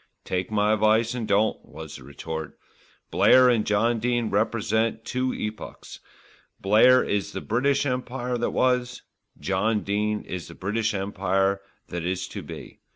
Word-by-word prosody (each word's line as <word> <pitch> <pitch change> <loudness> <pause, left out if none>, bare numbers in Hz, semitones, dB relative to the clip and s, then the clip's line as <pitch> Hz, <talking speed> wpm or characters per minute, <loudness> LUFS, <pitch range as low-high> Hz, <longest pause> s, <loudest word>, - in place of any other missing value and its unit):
"Take 90 0 -2
my 105 0 +2
advice 110 +2 +3
and 120 -3 -4
don't," 105 +2 +1
was 80 0 -10
the - - -13
retort. 80 +2 -7 0.5
"Blair 130 -1 +6
and 115 -3 +1
John 115 +3 +2
Dene 120 -1 0
represent 110 0 0
two 130 0 -1
epochs: 105 0 -7 0.6
Blair 110 +6 +5
is 100 0 -2
the - - -3
British 140 +5 +1
Empire 125 -1 -2
that 120 - 0
was, 125 -1 0 0.4
John 105 +3 0
Dene 105 +1 -1
is 90 -2 -6
the - - -11
British 105 +3 -1
Empire 95 0 0 0.3
that 85 -2 -4
is 90 +1 -2
to - - -6
be. - - -10
110 Hz, 150 wpm, -25 LUFS, 100-120 Hz, 0.6 s, Blair